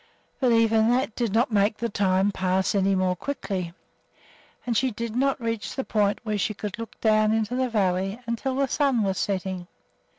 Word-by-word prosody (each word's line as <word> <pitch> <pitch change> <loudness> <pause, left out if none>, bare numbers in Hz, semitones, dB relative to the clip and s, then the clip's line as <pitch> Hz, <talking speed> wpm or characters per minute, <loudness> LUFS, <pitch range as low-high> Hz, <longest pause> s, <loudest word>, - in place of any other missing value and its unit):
But 255 -3 +3
even 225 -1 +4
that 245 -2 +1
did 235 -4 -1
not 235 +4 +2
make 205 +1 +2
the 235 - -1
time 195 -1 +1
pass 190 0 0
any 195 -1 +2
more 185 -1 +1
quickly, 190 -6 -4 0.9
and 240 -2 -1
she 260 +4 +2
did 230 0 -5
not 270 +2 +1
reach 230 -2 -3
the 265 - -2
point 205 -3 +1
where 215 -2 -2
she 215 - -1
could 210 +2 -6
look 230 -2 -8
down 215 -1 +3
into 220 +2 0
the 255 0 0
valley 195 -1 0
until 235 +3 -2
the 275 0 +1
sun 265 -4 +1
was 195 -1 -1
setting. 185 -2 -2
215 Hz, 190 wpm, -25 LUFS, 195-235 Hz, 0.9 s, even